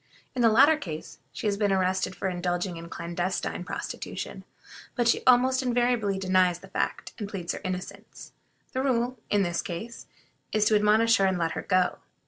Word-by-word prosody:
In 250 Hz, -, -1 dB
the 230 Hz, -, +6 dB
latter 285 Hz, +8 st, +6 dB
case 160 Hz, -, -7 dB
she -, -, -7 dB
has 205 Hz, -1 st, +1 dB
been 205 Hz, -1 st, +1 dB
arrested 185 Hz, 0 st, +1 dB
for -, -, -2 dB
indulging 175 Hz, 0 st, -2 dB
in 170 Hz, 0 st, -9 dB
clandestine 175 Hz, +2 st, -3 dB
prostitution, -, -, -6 dB, 0.5 s
but 240 Hz, -2 st, +1 dB
she 235 Hz, -, +3 dB
almost 255 Hz, +1 st, +5 dB
invariably 240 Hz, -5 st, +1 dB
denies 185 Hz, -2 st, +2 dB
the 195 Hz, +2 st, -15 dB
fact, -, -, -2 dB
and 205 Hz, -2 st, -4 dB
pleads 180 Hz, -4 st, -4 dB
her -, -, -7 dB
innocence. 185 Hz, -1 st, -6 dB, 0.4 s
The 260 Hz, -, 0 dB
rule, 250 Hz, -2 st, 0 dB
in 205 Hz, -1 st, +3 dB
this 175 Hz, -2 st, -1 dB
case, 205 Hz, +7 st, -7 dB, 0.5 s
is 215 Hz, -1 st, +3 dB
to 215 Hz, -, +4 dB
admonish 215 Hz, +2 st, +4 dB
her 195 Hz, -, +3 dB
and 190 Hz, -1 st, +1 dB
let 165 Hz, -2 st, 0 dB
her -, -, -3 dB
go. 185 Hz, -1 st, +1 dB
195 Hz, 180 wpm, -27 LUFS, 180-235 Hz, 0.5 s, the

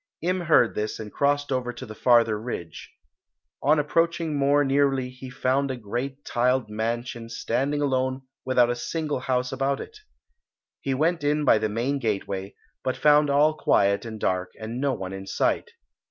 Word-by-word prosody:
Im 185 Hz, +2 st, +1 dB
heard 155 Hz, -8 st, +4 dB
this 105 Hz, 0 st, -3 dB
and 105 Hz, -1 st, -7 dB
crossed 145 Hz, 0 st, +1 dB
over 125 Hz, -2 st, -1 dB
to 120 Hz, +2 st, -9 dB
the 110 Hz, -, -9 dB
farther 115 Hz, -2 st, +3 dB
ridge. 85 Hz, -9 st, -7 dB, 0.7 s
On 150 Hz, +3 st, +4 dB
approaching 165 Hz, +1 st, +1 dB
more 140 Hz, +1 st, +3 dB
nearly 135 Hz, -2 st, +1 dB
he 130 Hz, 0 st, -10 dB
found 135 Hz, +2 st, 0 dB
a 130 Hz, -, -3 dB
great 125 Hz, +6 st, -5 dB
tiled 125 Hz, -2 st, +1 dB
mansion 115 Hz, +1 st, -3 dB
standing 140 Hz, +5 st, -1 dB
alone 130 Hz, -1 st, 0 dB, 0.2 s
without 125 Hz, -2 st, +3 dB
a -, -, -1 dB
single 150 Hz, +3 st, -3 dB
house 125 Hz, 0 st, -1 dB
about 135 Hz, +1 st, 0 dB
it. 425 Hz, -, -9 dB, 0.8 s
He 135 Hz, -1 st, -2 dB
went 160 Hz, +3 st, +1 dB
in 150 Hz, +1 st, +1 dB
by -, -, +5 dB
the 110 Hz, -, -1 dB
main 125 Hz, +6 st, -1 dB
gateway, 100 Hz, -4 st, -3 dB, 0.3 s
but 130 Hz, -, -1 dB
found 150 Hz, 0 st, +5 dB
all 145 Hz, +2 st, +4 dB
quiet 100 Hz, -9 st, +2 dB
and 110 Hz, -2 st, -7 dB
dark 90 Hz, -2 st, -1 dB
and 115 Hz, +3 st, -5 dB
no 140 Hz, -1 st, +2 dB
one 95 Hz, -5 st, -5 dB
in 95 Hz, 0 st, -7 dB
sight. -, -, 0 dB
130 Hz, 170 wpm, -25 LUFS, 115-145 Hz, 0.8 s, by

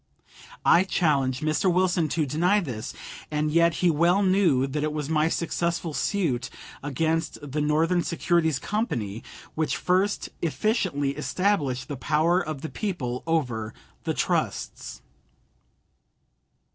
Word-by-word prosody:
I 175 Hz, -, +6 dB
challenge 140 Hz, -9 st, +1 dB
Mr. 155 Hz, +5 st, +2 dB
Wilson 175 Hz, -3 st, +2 dB
to 155 Hz, +1 st, 0 dB
deny 175 Hz, +9 st, +2 dB
this, 120 Hz, -, -5 dB, 0.4 s
and 150 Hz, 0 st, 0 dB
yet 170 Hz, 0 st, +4 dB
he 175 Hz, -, +6 dB
well 170 Hz, +6 st, +3 dB
knew 185 Hz, -9 st, +3 dB
that 145 Hz, +2 st, -3 dB
it 155 Hz, -, 0 dB
was 150 Hz, -1 st, -3 dB
my 155 Hz, 0 st, +3 dB
successful 170 Hz, -1 st, -1 dB
suit 155 Hz, -10 st, -1 dB, 0.3 s
against 160 Hz, +4 st, -1 dB
the 145 Hz, +1 st, -3 dB
Northern 160 Hz, +4 st, +2 dB
Securities 170 Hz, -3 st, +1 dB
Company 120 Hz, -, -2 dB, 0.3 s
which 155 Hz, -1 st, -1 dB
first 190 Hz, +3 st, +1 dB
efficiently 170 Hz, -, 0 dB
established 150 Hz, -5 st, 0 dB
the 145 Hz, -, -5 dB
power 155 Hz, +7 st, +2 dB
of 155 Hz, -4 st, -5 dB
the 160 Hz, -, -3 dB
people 130 Hz, -, -3 dB
over 120 Hz, -9 st, -1 dB, 0.3 s
the -, -, -1 dB
trusts. -, -, -2 dB
160 Hz, 125 wpm, -26 LUFS, 145-175 Hz, 0.4 s, I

